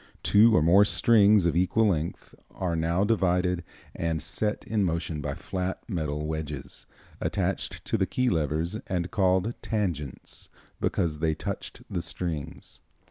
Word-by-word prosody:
Two 110 Hz, +2 st, +6 dB
or -, -, +4 dB
more 90 Hz, +5 st, +6 dB
strings 105 Hz, -2 st, +5 dB
of 85 Hz, -, +2 dB
equal 100 Hz, +5 st, +3 dB
length 85 Hz, -2 st, -3 dB, 0.2 s
are 90 Hz, -3 st, -2 dB
now 85 Hz, +4 st, +1 dB
divided 90 Hz, -4 st, +1 dB, 0.3 s
and 80 Hz, -1 st, -1 dB
set 105 Hz, +7 st, -2 dB
in 110 Hz, -2 st, 0 dB
motion 80 Hz, -3 st, -1 dB
by 70 Hz, -1 st, -3 dB
flat 95 Hz, +3 st, -4 dB
metal 75 Hz, -7 st, -2 dB
wedges, 75 Hz, -3 st, -5 dB, 0.3 s
attached -, -, -2 dB
to 110 Hz, -, 0 dB
the 95 Hz, -, +2 dB
key 125 Hz, 0 st, 0 dB
levers, 80 Hz, -, 0 dB
and 90 Hz, -2 st, -2 dB
called 95 Hz, 0 st, +2 dB
tangents, 85 Hz, -, -3 dB, 0.3 s
because 75 Hz, -3 st, 0 dB
they 80 Hz, -1 st, +1 dB
touched -, -, -6 dB
the 85 Hz, -, -3 dB
strings. 80 Hz, -3 st, -5 dB
90 Hz, 140 wpm, -27 LUFS, 80-100 Hz, 0.3 s, Two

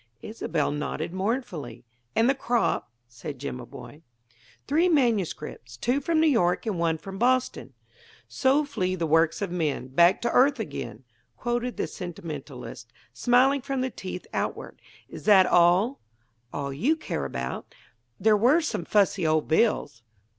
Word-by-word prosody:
Isobel 165 Hz, -9 st, -2 dB
nodded 150 Hz, +3 st, -3 dB
mournfully. 185 Hz, -, -3 dB, 0.3 s
"And 230 Hz, -, +4 dB
the 270 Hz, -, +4 dB
crop?" 240 Hz, -, 0 dB, 0.2 s
said 120 Hz, +4 st, -8 dB
Jimaboy. 130 Hz, +3 st, -8 dB, 0.7 s
"Three 325 Hz, +6 st, +3 dB
manuscripts; 195 Hz, -, -1 dB
two 250 Hz, -, 0 dB
from 325 Hz, +2 st, +1 dB
New 320 Hz, -, +4 dB
York 180 Hz, -, +2 dB
and 205 Hz, -6 st, -2 dB
one 165 Hz, -1 st, +1 dB
from 195 Hz, +4 st, -9 dB
Boston." 255 Hz, +1 st, 0 dB, 0.5 s
"'So 275 Hz, +3 st, +2 dB
flee 185 Hz, -10 st, -2 dB
the 170 Hz, -2 st, -2 dB
works 165 Hz, +5 st, +2 dB
of 195 Hz, -, -3 dB
men 155 Hz, -7 st, -2 dB
Back 170 Hz, +7 st, +4 dB
to -, -, +1 dB
the -, -, -4 dB
earth 270 Hz, +1 st, +4 dB
again,'" 120 Hz, -, -6 dB, 0.3 s
quoted 240 Hz, +1 st, -2 dB
the -, -, 0 dB
sentimentalist, 145 Hz, -, -8 dB, 0.2 s
smiling 255 Hz, -, +3 dB
from 270 Hz, 0 st, -2 dB
the 260 Hz, 0 st, -2 dB
teeth 185 Hz, -3 st, -7 dB
outward. -, -, -4 dB, 0.3 s
"Is -, -, -10 dB
that 195 Hz, -3 st, +7 dB
all?" 180 Hz, +10 st, +3 dB, 0.5 s
"All 140 Hz, -1 st, -4 dB
you 245 Hz, -, +2 dB
would 320 Hz, -, -9 dB
care 70 Hz, -, -3 dB
about. 65 Hz, -1 st, -5 dB, 0.4 s
There 215 Hz, 0 st, +4 dB
were 250 Hz, +11 st, +4 dB
some 240 Hz, -, -3 dB
fussy 195 Hz, -4 st, +2 dB
old 155 Hz, -1 st, +1 dB
bills." 160 Hz, -, +1 dB
185 Hz, 150 wpm, -26 LUFS, 150-245 Hz, 0.7 s, that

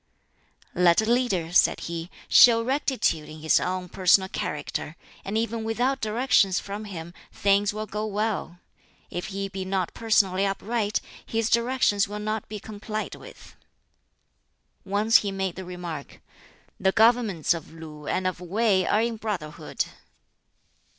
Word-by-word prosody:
"Let 175 Hz, +3 st, +4 dB
a -, -, -1 dB
leader," 215 Hz, -8 st, +1 dB
said -, -, +4 dB
he, 170 Hz, 0 st, -5 dB, 0.2 s
"show 230 Hz, -1 st, +7 dB
rectitude 255 Hz, -, 0 dB
in 155 Hz, 0 st, -10 dB
his 160 Hz, -, +4 dB
own 185 Hz, 0 st, -2 dB
personal 190 Hz, +1 st, +3 dB
character, 150 Hz, -1 st, -4 dB, 0.3 s
and 200 Hz, +3 st, -2 dB
even 230 Hz, 0 st, -1 dB
without 245 Hz, +5 st, 0 dB
directions 215 Hz, -4 st, +2 dB
from 205 Hz, +2 st, -6 dB
him 170 Hz, -4 st, -8 dB, 0.2 s
things 200 Hz, 0 st, +2 dB
will 215 Hz, +1 st, -4 dB
go 210 Hz, +1 st, -4 dB
well. 210 Hz, -4 st, -2 dB, 0.5 s
If 175 Hz, -, -4 dB
he 195 Hz, -1 st, -3 dB
be 190 Hz, -1 st, -5 dB
not 190 Hz, -1 st, -2 dB
personally 195 Hz, -4 st, +2 dB
upright, 205 Hz, +2 st, -1 dB, 0.2 s
his 225 Hz, 0 st, -1 dB
directions 235 Hz, -4 st, +2 dB
will 205 Hz, +1 st, -6 dB
not 215 Hz, 0 st, -3 dB
be 210 Hz, 0 st, -5 dB
complied 215 Hz, +1 st, -5 dB
with." -, -, -13 dB, 1.3 s
Once 205 Hz, +3 st, +4 dB
he 200 Hz, -, -2 dB
made 190 Hz, -2 st, -2 dB
the 190 Hz, -, -7 dB
remark, 175 Hz, -5 st, -7 dB, 0.6 s
"The 190 Hz, -, +3 dB
governments 220 Hz, -8 st, +3 dB
of 170 Hz, -, -8 dB
Lu 155 Hz, -2 st, -10 dB
and 185 Hz, -, -1 dB
of 185 Hz, -1 st, -2 dB
Wei 190 Hz, +1 st, +1 dB
are 215 Hz, +2 st, +3 dB
in 230 Hz, -1 st, -2 dB
brotherhood." 195 Hz, -9 st, -4 dB
200 Hz, 145 wpm, -26 LUFS, 180-220 Hz, 1.3 s, show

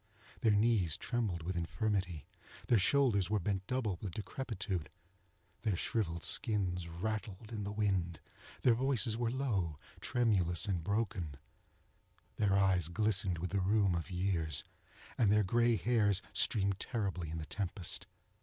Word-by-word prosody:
Their 110 Hz, -2 st, +3 dB
knees 105 Hz, -7 st, +2 dB
trembled 110 Hz, -9 st, -2 dB
with 90 Hz, +2 st, -3 dB
infirmity; 90 Hz, -1 st, -2 dB, 0.4 s
their 120 Hz, -, +4 dB
shoulders 100 Hz, -3 st, +3 dB
were 105 Hz, -, +2 dB
bent 95 Hz, 0 st, -2 dB
double 115 Hz, -8 st, -1 dB
with 95 Hz, -5 st, -5 dB
decrepitude; 100 Hz, -, -4 dB, 0.7 s
their 110 Hz, -5 st, 0 dB
shrivelled 85 Hz, -3 st, -2 dB
skins 95 Hz, -8 st, +2 dB
rattled 105 Hz, +4 st, -4 dB
in 105 Hz, -2 st, -3 dB
the 100 Hz, -, -3 dB
wind; 95 Hz, -6 st, 0 dB, 0.4 s
their 125 Hz, -, +6 dB
voices 125 Hz, -2 st, +1 dB
were 120 Hz, 0 st, 0 dB
low, 105 Hz, -, -1 dB, 0.2 s
tremulous 95 Hz, -8 st, +2 dB
and 90 Hz, -5 st, -1 dB
broken; 95 Hz, -6 st, -2 dB, 1.0 s
their 100 Hz, -2 st, +3 dB
eyes 95 Hz, -4 st, +3 dB
glistened 95 Hz, -1 st, +2 dB
with 90 Hz, +2 st, -4 dB
the 100 Hz, -1 st, +1 dB
rheum 100 Hz, 0 st, +3 dB
of 85 Hz, +1 st, -3 dB
years; 90 Hz, -5 st, 0 dB, 0.6 s
and 105 Hz, -4 st, +4 dB
their 105 Hz, 0 st, +4 dB
gray 120 Hz, +4 st, +3 dB
hairs 105 Hz, -4 st, +2 dB
streamed 100 Hz, -3 st, +2 dB
terribly 100 Hz, -9 st, -3 dB
in 80 Hz, -, -4 dB
the 80 Hz, -, -5 dB
tempest. 95 Hz, -1 st, -2 dB
100 Hz, 140 wpm, -34 LUFS, 90-110 Hz, 1.0 s, their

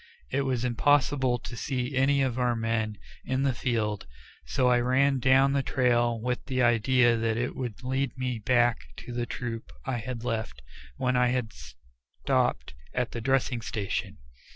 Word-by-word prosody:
It 140 Hz, -, +1 dB
was 125 Hz, -2 st, 0 dB
impossible 130 Hz, 0 st, +2 dB
to 120 Hz, -, -9 dB
see 130 Hz, +1 st, -3 dB
any 135 Hz, +1 st, +3 dB
of 130 Hz, -1 st, -1 dB
our 125 Hz, -1 st, +2 dB
men 115 Hz, -2 st, -1 dB, 0.3 s
in 130 Hz, +1 st, -1 dB
the 135 Hz, -2 st, +2 dB
field, 110 Hz, -, -2 dB, 0.4 s
so 125 Hz, -, +1 dB
I 125 Hz, -1 st, +4 dB
ran 130 Hz, +2 st, +2 dB
down 135 Hz, +2 st, +4 dB
the 140 Hz, -, +2 dB
trail 120 Hz, -3 st, +1 dB
with 125 Hz, +2 st, -2 dB
the 130 Hz, -2 st, +1 dB
idea 120 Hz, +1 st, +4 dB
that 115 Hz, 0 st, 0 dB
it 125 Hz, +2 st, -2 dB
would 125 Hz, -3 st, -5 dB
lead 130 Hz, +1 st, -1 dB
me 125 Hz, -2 st, -2 dB
back 120 Hz, +1 st, +2 dB, 0.3 s
to 120 Hz, -, -7 dB
the 120 Hz, 0 st, -2 dB
troop 115 Hz, -2 st, -5 dB
I 130 Hz, -2 st, -1 dB
had 120 Hz, 0 st, -5 dB
left 110 Hz, -, -3 dB, 0.3 s
when 125 Hz, -1 st, 0 dB
I 125 Hz, 0 st, +4 dB
had 125 Hz, -2 st, -1 dB
stopped 60 Hz, 0 st, -3 dB, 0.2 s
at 125 Hz, -1 st, -1 dB
the 115 Hz, -, -5 dB
dressing 130 Hz, -1 st, +1 dB
station. 105 Hz, -3 st, -3 dB
125 Hz, 170 wpm, -28 LUFS, 115-130 Hz, 0.4 s, I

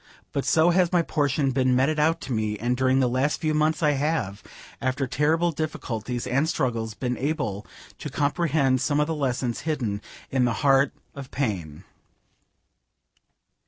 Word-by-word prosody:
But 140 Hz, -, -2 dB
so 165 Hz, +2 st, +4 dB
has 180 Hz, -1 st, +3 dB
my 175 Hz, -2 st, +3 dB
portion 145 Hz, -3 st, 0 dB
been 130 Hz, -1 st, +2 dB
meted 145 Hz, +5 st, +2 dB
out 160 Hz, +2 st, +2 dB
to 130 Hz, -, -4 dB
me; 110 Hz, -1 st, -1 dB
and 120 Hz, +4 st, 0 dB
during 130 Hz, +1 st, +2 dB
the 130 Hz, -, +3 dB
last 130 Hz, +4 st, 0 dB
few 155 Hz, -1 st, 0 dB
months 155 Hz, +1 st, +1 dB
I 150 Hz, -, +4 dB
have, 140 Hz, -9 st, -1 dB, 0.4 s
after 130 Hz, +1 st, 0 dB
terrible 155 Hz, +6 st, +1 dB
difficulties 125 Hz, -6 st, -4 dB
and 140 Hz, +6 st, +1 dB
struggles, 115 Hz, -7 st, -1 dB
been 125 Hz, 0 st, -3 dB
able 135 Hz, -, -2 dB, 0.3 s
to -, -, -5 dB
comprehend 145 Hz, -3 st, +1 dB
some 145 Hz, +3 st, +1 dB
of 150 Hz, -, +3 dB
the 160 Hz, -, -2 dB
lessons 130 Hz, -5 st, -1 dB
hidden 120 Hz, -11 st, -2 dB, 0.3 s
in 130 Hz, -2 st, +2 dB
the 120 Hz, -, +1 dB
heart 135 Hz, 0 st, +5 dB, 0.2 s
of 140 Hz, -2 st, -8 dB
pain. 95 Hz, -, -3 dB
135 Hz, 160 wpm, -25 LUFS, 125-155 Hz, 0.4 s, heart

